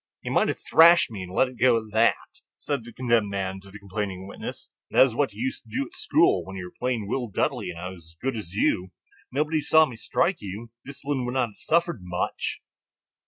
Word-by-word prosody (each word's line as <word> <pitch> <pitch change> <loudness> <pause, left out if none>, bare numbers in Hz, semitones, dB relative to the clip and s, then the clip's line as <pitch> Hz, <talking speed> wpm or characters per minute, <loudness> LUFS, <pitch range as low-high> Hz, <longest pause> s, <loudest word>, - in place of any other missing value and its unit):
"You - - -4
might - - +3
have - - -1
thrashed 170 -4 +6
me 105 -4 -6
and 90 -1 -7
let 130 - +3
it 125 -1 -12
go 120 -1 +5
at 110 -1 -6
that," 110 +2 +4 0.4
said 140 -5 -3
the 120 - -10
condemned 115 -5 +1
man 95 -1 -3
to 100 - -15
the 100 - -10
complaining 100 -2 -5
witness; - - -8 0.2
"that - - +6
is 130 - -3
what 140 +4 +1
you - - -5
used 265 +2 -2
to - - -22
do 275 +2 -1
at 350 - -15
school, 370 -3 +3
when 95 - -9
you 95 -1 -5
were 90 - -12
plain 125 -4 -1
Will 125 +3 -1
Dudley - - -1
and - - -7
I 90 +2 -4
was 90 -3 -11
as - - -44
good 135 -1 -2
as 105 -6 -6
you. 95 -2 +1 0.4
Nobody 150 +3 0
saw 160 +1 +5
me 130 - -8
strike 170 - 0
you; 105 +4 -7
discipline 140 -1 -3
would 125 +1 -3
not 125 -3 +1
have 105 - -19
suffered 170 -4 +1
much." 90 0 -3
115 Hz, 235 wpm, -26 LUFS, 100-140 Hz, 0.4 s, thrashed